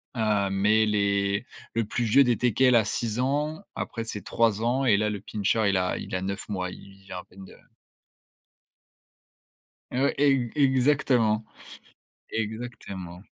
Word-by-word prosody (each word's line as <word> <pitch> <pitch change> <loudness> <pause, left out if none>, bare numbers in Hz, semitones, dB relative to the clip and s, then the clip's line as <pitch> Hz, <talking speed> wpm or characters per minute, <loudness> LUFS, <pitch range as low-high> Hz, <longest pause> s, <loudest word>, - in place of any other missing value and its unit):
heu, 105 -4 +1
mais 105 +3 +3
les 100 0 +1 0.3
le 115 -1 0
plus 120 +3 -2
vieux 120 +5 +5
des 120 -2 +2
Teckels 125 +1 +3
a 115 - +5
6 115 +2 -2
ans, 150 +6 -1
après 115 - -4
c'est 105 -2 -5
3 110 -1 +1
ans. 125 +4 +1
Et 110 -5 +5
là, 105 +1 +1
le 105 -2 -4
Pinscher, 105 +2 0
il 100 - +2
a 90 0 0
il - - -8
a 90 - -1
9 100 +3 -4
mois, 90 -3 -2
il - - -11
il 95 0 -16
vient 95 -1 -7
à - - -10
peine 95 +1 -14
de - - -14 2.4
Heu 130 +2 0
ouais, - - 0
e 135 -4 +3
exactement, 130 -5 +3 0.9
exactement. 105 -5 -5
110 Hz, 160 wpm, -26 LUFS, 100-125 Hz, 2.4 s, vieux